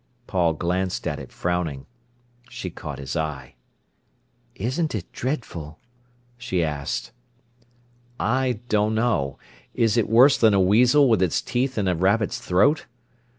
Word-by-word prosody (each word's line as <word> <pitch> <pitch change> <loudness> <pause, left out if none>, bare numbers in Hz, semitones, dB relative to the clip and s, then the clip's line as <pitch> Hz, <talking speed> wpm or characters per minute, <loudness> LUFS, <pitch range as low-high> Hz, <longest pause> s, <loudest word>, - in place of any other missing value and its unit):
Paul 85 -6 +1
glanced 90 +3 -2
at - - -3
it - - -10
frowning. 85 -6 -2 0.6
She 115 -7 -6
caught - - -7
his 70 +2 -6
eye. 75 -5 -4 1.0
"Isn't 130 - -2
it 95 -5 -6
dreadful?" 90 - -5 0.6
she 95 -8 -1
asked. 75 -3 -3 1.1
"I 125 0 0
don't 105 0 +1
know! 110 - 0 0.4
Is 115 -1 +2
it 110 -2 +1
worse 125 +5 +6
than 110 -3 +5
a - - +3
weasel 125 +9 +5
with 110 -6 +3
its 90 -3 +2
teeth 130 +1 -2
in 100 -3 0
a 90 - +2
rabbit's 100 +7 +1
throat? 120 - +2
105 Hz, 135 wpm, -24 LUFS, 85-120 Hz, 1.1 s, worse